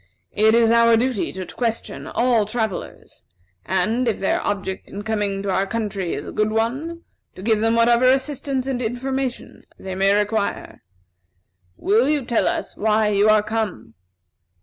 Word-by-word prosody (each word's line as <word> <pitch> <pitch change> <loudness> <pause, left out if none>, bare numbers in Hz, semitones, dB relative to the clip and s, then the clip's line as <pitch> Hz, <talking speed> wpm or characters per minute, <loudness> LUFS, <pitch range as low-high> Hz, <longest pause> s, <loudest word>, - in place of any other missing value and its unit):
It 220 +2 +4
is 230 -1 +4
our 230 0 +5
duty 245 -3 -1
to 190 -1 -5
question 230 +3 -4
all 235 -4 +1
travellers, 220 -3 -5 0.4
and, 220 +7 0
if 225 - 0
their 195 - 0
object 195 -2 -3
in 205 - -7
coming 205 -2 -2
to 200 - -1
our 195 +1 +1
country 200 -4 -3
is - - -6
a - - -7
good 215 0 0
one, 265 +10 -2 0.3
to 185 - -10
give 220 -1 +2
them 225 +1 +2
whatever 235 +1 +4
assistance 265 0 +1
and 260 -2 -2
information 260 +2 -3 0.2
they 190 - -7
may 195 +1 +2
require. 210 0 -2 1.0
Will 225 +7 +2
you 295 -4 0
tell 235 -1 +1
us - - -2
why 215 0 +2
you 205 +1 +3
are 215 -1 +5
come?" 210 - -3
220 Hz, 160 wpm, -22 LUFS, 205-245 Hz, 1.0 s, our